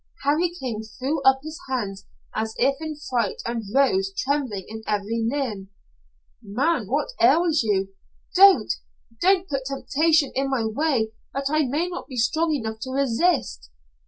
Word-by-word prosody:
Harry 305 +5 +2
King 255 -10 -5
threw 260 +7 -3
up 265 0 +4
his 315 +1 -7
hands 200 -7 -3 0.3
as 220 0 -3
if 270 +2 +3
in 315 -1 -4
fright 250 -8 -2
and 235 0 -2
rose, 200 -7 +2
trembling 260 -9 -1
in 220 0 -7
every 210 +2 -1
limb. 230 -9 -3 0.7
"Man, 245 - 0
what 290 - 0
ails 330 -2 +4
you?" 195 -4 0 0.4
"Don't. 390 0 +6 0.5
Don't 375 0 +3
put 275 -4 -3
temptation 295 +2 +2
in 270 +1 0
my 255 -4 0
way 230 -1 0 0.2
that 275 +1 -1
I 310 -1 +2
may 300 +7 0
not 360 0 -6
be 255 - -8
strong 315 +8 +1
enough 220 -7 -3
to 260 - -6
resist." 260 - 0
265 Hz, 155 wpm, -24 LUFS, 220-310 Hz, 0.7 s, Don't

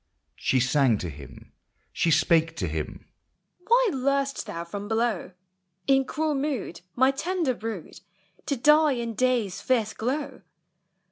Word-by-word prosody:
She 130 - +1
sang 130 -2 +3
to 90 -4 -5
him, 70 -3 -13 0.4
she 170 - +1
spake 165 0 +3
to 90 - -2
him,— 75 -1 -5 0.3
" 195 - -36
Why 480 +1 +5
lur'st 275 +1 0
thou 170 - -4
from 200 +4 -6
below, 220 -4 -1 0.5
In 270 -1 +3
cruel 310 +3 -1
mood, 270 - -3
my 260 +2 +4
tender 335 0 -1
brood, 220 -7 -7 0.5
To 280 - +1
die 300 +3 +5
in 235 -2 -3
day's 225 -5 0
fierce 225 -4 +1
glow 275 +6 -3
235 Hz, 140 wpm, -26 LUFS, 170-275 Hz, 0.5 s, Why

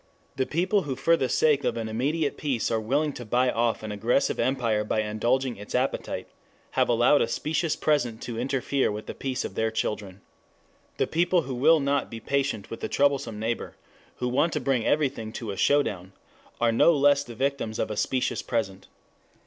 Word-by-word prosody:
The 130 -1 -1
people 185 +5 +1
who 140 -6 -4
for 155 +6 +3
the 130 -5 -1
sake 150 -3 +3
of - - 0
an 115 -1 -3
immediate 140 +7 -1
peace 135 -7 -1
are 115 - +1
willing 140 +7 0
to 125 - -7
buy 125 +3 +2
off 115 -1 0
an 110 - -4
aggressive 115 +6 +1
empire 115 -5 +1
by 110 +1 0
indulging 120 +3 0
its 105 +1 -7
appetite 130 +2 -1 0.4
have - - +1
allowed 120 +5 +4
a - - +2
specious 155 +1 -1
present 125 -7 0
to 115 -2 -5
interfere 135 +1 0
with 105 +1 -6
the - - -6
peace 130 -2 -3
of - - -6
their 110 0 0
children. 105 -3 -3 0.8
The - - +2
people 175 +1 +2
who 130 - -5
will 155 +6 +4
not 140 0 0
be 115 - -7
patient 135 -6 -2
with 115 - -7
a - - -2
troublesome 140 -6 +1
neighbor, 115 +2 -3 0.4
who 125 - -2
want 140 +7 +1
to - - 0
bring 130 -5 0
everything 135 -7 0
to 115 -4 -5
a - - -5
"showdown" 95 -6 +1 0.5
are 120 -1 +3
no 140 +9 +5
less 145 0 +4
the 120 -4 -10
victims 135 -3 -2
of - - -2
a - - -3
specious 130 +3 0
present. 100 -5 -3
125 Hz, 195 wpm, -26 LUFS, 110-140 Hz, 0.8 s, no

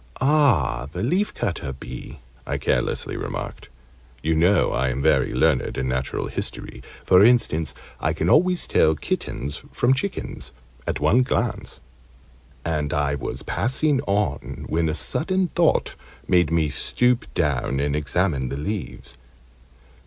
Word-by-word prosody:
"Ah, 135 - +3
the 90 - -3
leafcutter 115 - -1
bee!" - - -8 0.3
I - - -1
carelessly - - -1
remarked - - -5 0.5
you 80 +1 +2
know 85 +3 +3
I 65 +1 +1
am 65 +1 -2
very 70 - +3
learned 80 -6 +1
in 65 - -1
Natural 65 +1 -2
History - - -6 0.2
(for 90 +1 +6
instance, 110 -9 +3 0.2
I - - 0
can - - -1
always 180 +3 +3
tell 80 - +3
kittens 70 0 -4
from 120 +2 +3
chickens 165 - -4 0.3
at - - -1
one 125 - +4
glance) 125 - -2 0.8
and 75 -3 -1
I 75 -1 +1
was 70 - -4
passing 135 +3 +1
on, 100 -8 -1
when 80 0 +1
a 75 - -1
sudden 185 - 0
thought 170 -2 +2 0.3
made 90 -4 +4
me 80 -3 +1
stoop 125 - 0
down 70 -4 0
and 70 0 0
examine 75 -2 0
the 70 - -4
leaves. 75 - -5
80 Hz, 135 wpm, -23 LUFS, -, 0.8 s, for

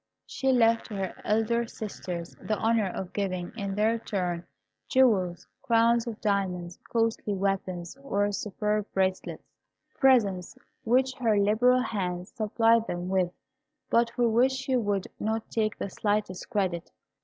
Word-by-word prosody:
She 265 -1 0
left 230 -2 +3
to 210 - -7
her 190 -2 -3
elder 225 +2 +1
sisters 180 -6 -6
the 215 - -1
honour 225 -2 +2
of 185 0 -5
giving, 185 -3 -2
in 200 -3 -3
their 220 +2 +2
turn, 180 -6 -3 0.4
jewels, 195 -10 +2 0.2
crowns 235 0 +3
of 225 -2 -5
diamonds, 185 -5 -1
costly 225 -3 0
weapons, 190 -2 -2
or 205 -7 0
superb 210 +1 -1
bracelets, 190 -1 -1 0.5
presents 205 -10 +3 0.3
which 260 +3 +3
her 225 -4 +2
liberal 225 +5 +4
hand 180 -6 -3
supplied 225 +1 +2
them 175 +1 -3
with, 185 -2 +1 0.6
but 235 0 +4
for 240 0 +1
which 240 +4 +3
she 265 0 -1
would 205 -5 0
not 220 +1 -2
take 215 -2 0
the 200 - -4
slightest 205 -3 -2
credit. 185 -7 -1
210 Hz, 140 wpm, -28 LUFS, 190-230 Hz, 0.6 s, liberal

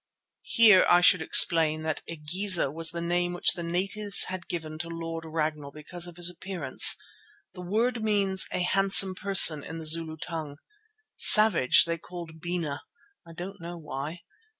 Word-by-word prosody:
Here 215 -5 +5
I 175 - +3
should 180 -1 +3
explain 160 -1 +2
that 160 -1 -5
"Igeza" 165 +1 -2
was 165 +1 -2
the 170 0 -7
name 175 +1 -3
which 175 - +2
the 175 - -8
natives 195 +4 0
had 185 -2 -9
given 155 -2 -8
to 165 +1 -7
Lord 165 -1 -8
Ragnall 155 -2 -5
because 170 +4 -5
of 175 - -13
his 175 -1 0
appearance. 175 -5 +2 0.6
The 180 - -12
word 225 +6 -3
means 200 -3 -1
a 180 - -4
handsome 195 0 +3
person 185 -6 +6
in 165 - -10
the 160 - -10
Zulu 160 0 0
tongue. 155 -3 -9 0.6
Savage 215 - +5
they 170 0 -6
called 170 -2 -13
"Bena," 170 -4 -6 0.5
I 165 - -14
don't 180 +3 -11
know 170 +1 -10
why. 150 +2 -9
170 Hz, 160 wpm, -24 LUFS, 160-185 Hz, 0.6 s, person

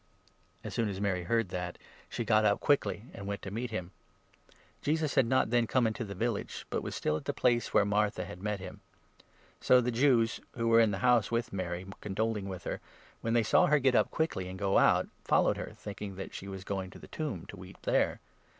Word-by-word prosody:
As - - -6
soon 115 -3 0
as 95 -1 -4
Mary 95 -3 -1
heard 115 -1 +1
that, 90 -1 -4 0.3
she 120 - -3
got 110 -1 +4
up 105 -1 +3
quickly, 140 -6 +1
and 100 - -7
went 100 0 -4
to 95 - -4
29 - - -7
meet 125 - -3
him. 90 -5 -4 0.9
Jesus 155 0 0
had 130 -4 +4
not 130 -3 +2
then 120 -1 +3
come 125 0 +2
into 110 +2 -1
the 100 -2 -7
village, 115 +2 -2
but - - 0
was - - -5
30 - - -4
still 75 - +1
at 75 - -9
the - - -2
place 120 -1 +2
where 100 - +4
Martha 105 -3 +1
nad 90 -2 -9
met 105 0 -2
him. 95 - -9 0.8
So 125 - +5
the 125 0 0
Jews, 115 -2 +3 0.2
who 115 - -2
31 - - +3
were 115 - +7
in 115 -2 +5
the 100 - -2
house 120 -4 +4
with 115 -1 -1
Mary, 90 -1 -3 0.2
condoling 105 0 -2
with 95 -2 -6
her, - - -4 0.4
when 115 - -1
they 120 -1 +4
saw - - +4
her 150 - +5
get 135 -2 +3
up - - +3
quickly 160 - -1
and 95 +1 -7
go 100 0 +3
out, - - +4 0.2
followed - - +3
her, - - -5
thinking 100 -1 -7
that 95 - -7
she 95 - -7
was 95 -1 -6
going 95 -1 -3
to - - -12
the - - -12
tomb 145 - -4
ki - - -10
weep 95 +1 -11
there. - - +1
105 Hz, 235 wpm, -31 LUFS, 95-120 Hz, 0.9 s, were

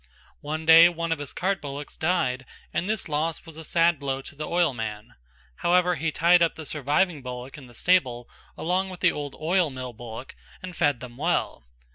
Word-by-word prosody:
One 155 +2 -4
day 165 +1 +9
one 170 -1 -3
of 165 - 0
his 145 -2 -6
cart 195 +2 -1
bullocks 145 0 -7
died 130 -7 0 0.3
and 180 - -1
this 220 -2 -2
loss 155 +2 -2
was 165 -2 -11
a 160 - -7
sad 165 -1 +2
blow 135 -1 -3
to - - -11
the 150 +1 -5
oilman. 115 -11 -1 0.4
However 180 +1 +3
he 165 0 -1
tied 170 +3 +4
up 170 - +3
the 160 - -8
surviving 150 +3 0
bullock 125 +1 -7
in 140 -4 -11
the 120 - -14
stable 130 -10 +2 0.3
along 185 +3 0
with 185 -2 -9
the - - +5
old 145 -2 -6
oil 170 +1 +2
mill 130 -2 -7
bullock 115 +2 -9 0.3
and 180 -1 -7
fed 145 -7 +1
them 125 -1 -9
well. - - -1
155 Hz, 195 wpm, -26 LUFS, 130-170 Hz, 0.4 s, day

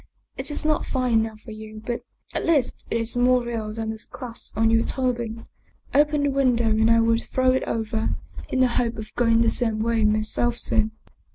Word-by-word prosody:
It 265 +3 0
is 295 - 0
not 305 -1 +1
fine 255 -3 0
enough 220 -1 -3
for 225 - -11
you, 215 0 -9
but 240 -1 -3 0.3
at - - -2
least 300 -7 +1
it - - 0
is 230 +1 +2
more 250 0 +3
real 225 -3 -4
than 220 0 -4
the 220 0 -7
clasp 235 -4 -5
on 225 0 +3
your 225 0 +4
turban. 240 -3 -2 0.5
Open 295 0 +3
the 285 - +2
window 250 -4 +2
and 220 +1 +3
I 230 0 +5
will 230 0 +3
throw 255 +1 +1
it 260 - +1
over, 220 0 -2 0.3
in 260 - +1
the 255 - +5
hope 235 -1 -1
of 215 0 -8
going 230 -1 +3
the 230 - +4
same 225 -3 +1
way 230 -1 +1
myself 215 +3 +1
soon." 220 -1 +1
230 Hz, 205 wpm, -24 LUFS, 220-255 Hz, 0.5 s, I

